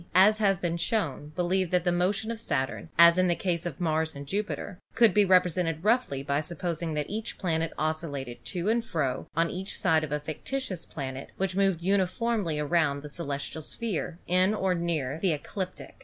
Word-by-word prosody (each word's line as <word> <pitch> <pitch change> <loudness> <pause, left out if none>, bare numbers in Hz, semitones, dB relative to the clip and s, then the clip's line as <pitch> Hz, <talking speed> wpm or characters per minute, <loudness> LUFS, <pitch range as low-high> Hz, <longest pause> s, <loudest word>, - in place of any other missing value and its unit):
[?]), - - -24
as 210 +4 +6
has 195 -3 +3
been 175 -2 -1
shown, 165 - -1
believed 185 +1 +1
that 180 -1 +2
the 175 - +2
motion 195 +5 +1
of 230 - -5
Saturn, 145 - -2
as 170 +1 +8
in 185 - +4
the 175 - +2
case 175 -2 -1
of 155 - -6
Mars 160 -2 0
and 140 0 -7
Jupiter, 200 +2 -3 0.2
could 230 -5 +6
be 210 - +5
represented 180 -3 +2
roughly 215 - +2
by 140 0 0
supposing 165 0 -3
that 150 -1 -1
each 215 +2 -4
planet 165 -3 0
oscillated 150 -5 -3
to 180 0 -3
and 230 +2 +2
fro 140 - -2
on 165 +1 +2
each 190 +2 -5
side 160 -4 +3
of 150 - -4
a 150 - 0
fictitious 175 - -4
planet 135 -2 -6
which 190 -1 -1
moved 195 -4 +2
uniformly 195 -1 +1
around 150 -2 +1
the 150 - -7
celes 145 -3 -4
tial 160 - -6
sphere 190 -2 -3
in 185 +4 +3
or 190 -3 +1
near 160 -5 -1
the 185 -4 +3
ecliptic. 185 +5 -6
175 Hz, 195 wpm, -28 LUFS, 155-195 Hz, 0.2 s, as